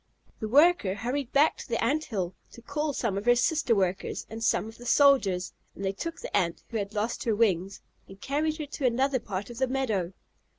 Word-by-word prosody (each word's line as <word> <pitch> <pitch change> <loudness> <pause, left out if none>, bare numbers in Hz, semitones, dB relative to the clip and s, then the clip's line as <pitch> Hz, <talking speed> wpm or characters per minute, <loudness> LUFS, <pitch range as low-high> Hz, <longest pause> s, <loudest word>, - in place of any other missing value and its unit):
The 220 - -3
worker 280 - +4
hurried 245 +5 -3
back 290 +3 +4
to - - -10
the 230 - 0
Ant 300 +6 +1
hill 190 -6 -3 0.2
to 235 - -12
call 300 +3 -2
some 225 -7 -1
of 205 - -10
her 245 0 +6
sister 250 -1 +2
workers, 190 -1 -1
and 225 +1 -5
some 220 - +2
of 225 +1 -12
the 245 - -10
soldiers, 225 -12 +4 0.2
and 195 - -5
they 190 - +1
took 330 +12 -6
the - - -5
Ant 170 -2 0
who 230 - -3
had 205 0 -4
lost 215 +3 -1
her 225 -3 +2
wings 195 -3 +1 0.3
and 195 0 -13
carried 305 +6 -1
her 305 - -4
to 285 -1 -5
another 260 +2 +1
part 200 0 -5
of 235 - -9
the 260 - +2
meadow. 220 -9 -1
230 Hz, 220 wpm, -28 LUFS, 200-275 Hz, 0.3 s, her